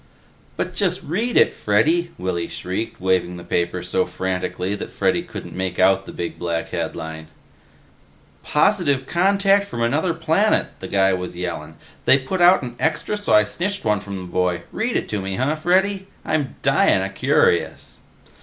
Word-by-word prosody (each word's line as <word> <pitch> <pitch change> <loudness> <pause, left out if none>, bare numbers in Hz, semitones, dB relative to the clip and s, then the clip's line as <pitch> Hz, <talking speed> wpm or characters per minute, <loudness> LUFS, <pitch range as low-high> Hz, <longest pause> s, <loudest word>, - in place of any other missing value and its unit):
"But - - -2
just - - 0
read 225 +10 -1
it, - - +5
Freddy," 160 +12 +2
Willy 90 -2 -2
shrieked, 95 +5 -5
waving 90 -1 0
the 85 - -9
paper 85 +1 -1
so 90 +1 0
frantically 95 0 -3
that 105 - -5
Freddy - - +1
couldn't - - -9
make 95 -1 -3
out 95 +1 +3
the - - -7
big 85 - -5
black 85 -1 -2
headline. 80 0 -5 1.1
"'Positive 150 -5 +2
contact 195 +4 +3
from 120 -11 -3
another 155 +8 +1
planet,' 165 +6 +2
the 95 - -6
guy 95 0 +3
was 90 -1 -4
yellin'. 80 -3 -5 0.3
They 135 - +6
put 140 +7 -3
out 175 -2 +6
an 120 -1 -7
Extra 160 +8 0
so 205 0 -1
I 105 - +7
snitched 190 - -3
one 105 -1 +2
from 100 0 -7
the 95 - -6
boy. 90 -1 -1
Read 230 +2 -1
it - - -3
to 105 -2 -2
me, 95 0 -3
huh, 135 +7 0
Freddy? 190 +4 +1 0.2
I'm 150 -4 -1
dyin' - - +3
o' - - -2
curious." - - +1
105 Hz, 170 wpm, -21 LUFS, -, 1.1 s, I